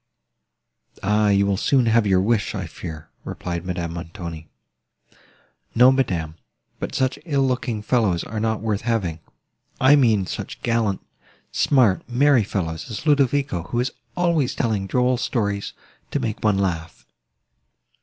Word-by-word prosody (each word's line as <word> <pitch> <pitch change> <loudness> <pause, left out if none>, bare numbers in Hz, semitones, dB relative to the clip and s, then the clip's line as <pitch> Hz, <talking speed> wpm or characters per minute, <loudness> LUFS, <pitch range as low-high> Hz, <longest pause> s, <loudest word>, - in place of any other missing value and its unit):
"Ah! 105 +1 +3
you 100 0 +3
will 100 -1 +1
soon 130 +4 +2
have 115 -1 +3
your 95 -1 +4
wish, 110 +1 0
I 95 -3 -3
fear," 80 -2 -8
replied 85 -1 -5
Madame 90 -2 -3
Montoni. 85 -2 -7 1.3
"No, 125 +3 +7
madam, 90 -13 0 0.5
but - - -4
such 130 +1 0
ill 140 -5 +1
looking 125 -4 -2
fellows 105 -8 +1
are 110 - -5
not 110 0 -1
worth 110 -2 -1
having. 100 -9 -1 0.6
I 130 +3 +6
mean 110 -8 +3
such - - -6
gallant, 115 -5 0 0.5
smart, 125 -10 +3
merry 130 0 +4
fellows 80 -5 -4
as 110 +5 -6
Ludovico, 140 - +2
who 120 - -2
is 125 +1 0 0.3
always 170 -6 +1
telling 105 -5 -1
droll 125 +3 +2
stories, 100 -5 -2 0.4
to - - -1
make 110 -2 -3
one 105 -2 +3
laugh. 85 -4 -3
110 Hz, 140 wpm, -22 LUFS, 95-125 Hz, 1.3 s, No